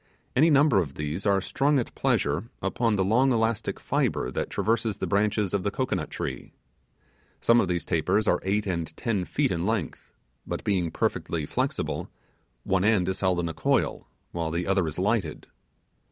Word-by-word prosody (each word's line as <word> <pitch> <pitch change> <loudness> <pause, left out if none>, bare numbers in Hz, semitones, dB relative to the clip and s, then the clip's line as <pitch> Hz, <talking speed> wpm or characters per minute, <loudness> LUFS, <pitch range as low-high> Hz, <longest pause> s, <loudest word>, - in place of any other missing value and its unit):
Any 155 +6 +5
number 145 -6 +5
of 70 -7 -3
these 75 +7 -3
are 100 -1 +4
strung 140 +9 +1
at 125 - -2
pleasure 75 +11 0
upon 110 +3 0
the 95 - +2
long 125 +7 +3
elastic 115 -2 0
fibre 60 - 0
that - - -3
traverses 110 +1 0
the - - -2
branches 105 -1 +1
of 100 - +1
the 100 - 0
cocoanut 100 -8 -2
tree. - - -5 0.9
Some 115 0 +4
of - - 0
these 85 -1 -1
tapers 90 +6 +1
are - - +3
eight 105 +2 0
or 85 -4 -1
ten 95 +5 -2
feet 140 +5 0
in 85 -1 -1
length; 110 -7 -3 0.4
but - - -4
being 90 -5 +1
perfectly 80 -1 -1
flexible, - - -2 0.5
one 95 -1 +1
end 100 -4 +3
is 95 - -3
held 95 -2 +1
in 85 - -2
a 80 - -4
coil, - - 0 0.2
while 85 -2 -2
the 85 +2 -2
other 95 -3 +1
is 80 - -5
lighted. 95 -4 -1
100 Hz, 180 wpm, -26 LUFS, 85-115 Hz, 0.9 s, Any